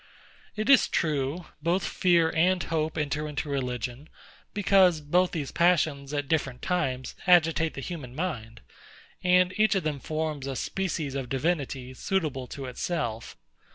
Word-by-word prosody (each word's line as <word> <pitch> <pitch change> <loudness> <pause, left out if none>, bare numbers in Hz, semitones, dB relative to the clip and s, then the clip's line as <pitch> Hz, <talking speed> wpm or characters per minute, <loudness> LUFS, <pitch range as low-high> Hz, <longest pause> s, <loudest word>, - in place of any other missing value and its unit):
It 215 +1 -2
is 275 -2 +6
true, 150 +2 -1 0.2
both 175 +4 +1
fear 170 -3 +3
and 180 +3 +3
hope 160 -1 -2
enter 150 0 -1
into 150 0 -4
religion; 125 0 -3 0.4
because 190 -4 +4
both 175 +5 +2
these 150 -6 -4
passions, 155 -5 +2
at 145 -1 -2
different 135 -5 -1
times, 130 -8 -1
agitate 165 -2 +4
the 140 - -5
human 135 -7 -7
mind, 120 -9 -4 0.6
and 180 0 +4
each 215 0 +4
of 190 - 0
them 150 -2 -2
forms 155 -2 -3
a 135 - -3
species 160 -4 -2
of 135 -3 -4
divinity 135 -3 -2
suitable 150 -5 -2
to 135 +2 -7
itself. 120 -4 -3
155 Hz, 145 wpm, -27 LUFS, 135-175 Hz, 0.6 s, is